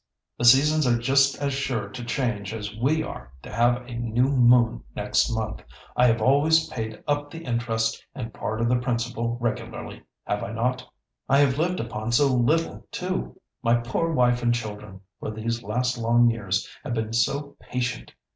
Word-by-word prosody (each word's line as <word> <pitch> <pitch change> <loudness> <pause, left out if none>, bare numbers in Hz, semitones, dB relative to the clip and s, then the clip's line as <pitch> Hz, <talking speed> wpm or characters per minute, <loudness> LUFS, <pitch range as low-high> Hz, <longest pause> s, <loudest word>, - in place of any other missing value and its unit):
The 120 - 0
seasons 145 +4 +6
are 120 -1 +3
just 135 +3 +3
as 140 -1 -1
sure 130 -6 -2
to 120 +4 -8
change 115 -5 -2
as 105 -1 -6
we 145 +8 +1
are 65 0 -8
to - - -9
have 120 +2 +2
a 125 - -8
new 120 +2 +1
moon 120 -3 +4
next - - +1
month. 110 -1 -3 0.3
I 125 - +5
have 115 -2 +2
always 155 +5 +4
paid 110 -4 -5
up 145 0 0
the 165 +2 -9
interest 115 -2 -1
and 115 -5 -6
part 110 +1 -3
of 115 - +2
the 125 +1 +2
principal 120 -1 -2
regularly, 120 -2 -4 0.2
have 105 - -2
I 100 - -5
not? 125 +3 -1 0.5
I 135 - +5
have 140 -1 +3
lived 180 +3 0
upon 115 0 -4
so 135 +2 +4
little 140 +7 +1
too! 60 0 -4 0.2
My 115 +1 +3
poor 130 +8 -1
wife 125 -4 +2
and 120 0 +2
children 105 -4 -7 0.2
for - - -4
these 115 +2 -3
last 125 +3 -1
long 120 +1 +4
years 100 -3 -2 0.2
have 130 -5 -3
been 110 0 -2
so 140 +5 0
patient! 125 -2 -4
120 Hz, 180 wpm, -25 LUFS, 115-135 Hz, 0.5 s, seasons